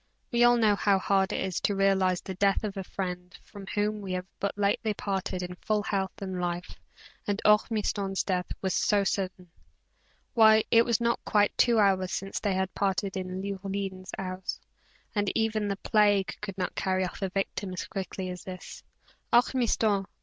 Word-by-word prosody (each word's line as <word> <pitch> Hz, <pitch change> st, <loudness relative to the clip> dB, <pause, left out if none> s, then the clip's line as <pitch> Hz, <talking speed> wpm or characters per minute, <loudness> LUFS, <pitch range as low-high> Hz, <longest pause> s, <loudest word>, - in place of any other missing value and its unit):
We 240 Hz, -1 st, +3 dB
all 240 Hz, 0 st, +6 dB
know 215 Hz, -3 st, +4 dB
how 200 Hz, -1 st, +3 dB
hard 190 Hz, 0 st, +1 dB
it -, -, -1 dB
is 190 Hz, -2 st, -2 dB
to 205 Hz, -, +1 dB
realize 190 Hz, -2 st, +2 dB
the 190 Hz, -, -6 dB
death 195 Hz, +3 st, +2 dB
of 210 Hz, -2 st, -3 dB
a 195 Hz, -, -4 dB
friend 180 Hz, -1 st, -5 dB
from 200 Hz, -2 st, -11 dB
whom 210 Hz, +1 st, -1 dB
we 190 Hz, -2 st, -4 dB
have 180 Hz, 0 st, -3 dB
but 200 Hz, 0 st, -2 dB
lately 205 Hz, +1 st, +1 dB
parted 190 Hz, -2 st, -2 dB
in 180 Hz, 0 st, -5 dB
full 210 Hz, +3 st, -1 dB
health 195 Hz, -1 st, -2 dB
and 185 Hz, -2 st, -3 dB
life, 175 Hz, 0 st, -3 dB, 0.5 s
and 205 Hz, 0 st, 0 dB
Ormiston's 210 Hz, -2 st, +2 dB
death 180 Hz, -2 st, -2 dB
was 190 Hz, -, 0 dB
so 205 Hz, -1 st, +2 dB
sudden. 185 Hz, -3 st, -3 dB, 0.8 s
Why, 220 Hz, -2 st, +6 dB
it 230 Hz, 0 st, +6 dB
was 235 Hz, -1 st, +1 dB
not 235 Hz, 0 st, +1 dB
quite 205 Hz, -1 st, +2 dB
two 235 Hz, -2 st, +4 dB
hours 190 Hz, -3 st, +3 dB
since 195 Hz, +1 st, -3 dB
they 200 Hz, -3 st, 0 dB
had 190 Hz, 0 st, -1 dB
parted 195 Hz, 0 st, -1 dB
in 185 Hz, 0 st, -4 dB
Leoline's 195 Hz, -1 st, -4 dB
house, 185 Hz, -1 st, -4 dB, 0.5 s
and 205 Hz, -2 st, 0 dB
even 220 Hz, -2 st, +1 dB
the 200 Hz, -, -1 dB
plague 205 Hz, -1 st, +2 dB
could 195 Hz, -2 st, -6 dB
not 185 Hz, -, -2 dB
carry 185 Hz, 0 st, 0 dB
off 180 Hz, -, -7 dB
a 195 Hz, -, 0 dB
victim 195 Hz, 0 st, -3 dB
as 185 Hz, -, -4 dB
quickly 190 Hz, -1 st, -5 dB
as 180 Hz, 0 st, -8 dB
this. 185 Hz, -1 st, -9 dB, 0.5 s
"Ormiston! 230 Hz, -5 st, +2 dB
195 Hz, 180 wpm, -28 LUFS, 185-210 Hz, 0.8 s, all